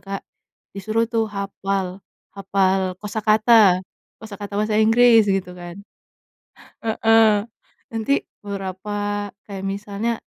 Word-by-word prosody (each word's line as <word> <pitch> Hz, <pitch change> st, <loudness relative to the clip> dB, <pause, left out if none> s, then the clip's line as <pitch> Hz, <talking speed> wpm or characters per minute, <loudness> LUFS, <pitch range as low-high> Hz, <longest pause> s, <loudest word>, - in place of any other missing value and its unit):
Kak, 195 Hz, +1 st, -6 dB, 0.5 s
disuruh 215 Hz, +3 st, 0 dB
tuh 225 Hz, -1 st, -1 dB
hafal, 195 Hz, -2 st, -3 dB, 0.3 s
hafal 190 Hz, -1 st, 0 dB
kosakata. 215 Hz, -2 st, +3 dB, 0.3 s
Kosakata 205 Hz, -2 st, -8 dB
bahasa 215 Hz, +1 st, +1 dB
Inggris 225 Hz, 0 st, +5 dB
gitu 195 Hz, -2 st, -1 dB
kan 175 Hz, +1 st, -9 dB, 1.1 s
heeh, 220 Hz, -1 st, +4 dB, 0.5 s
nanti 225 Hz, +5 st, 0 dB, 0.2 s
beberapa, 205 Hz, +1 st, -4 dB, 0.2 s
kayak 195 Hz, -1 st, -6 dB
misalnya 205 Hz, +3 st, -3 dB
205 Hz, 95 wpm, -21 LUFS, 195-220 Hz, 1.1 s, Inggris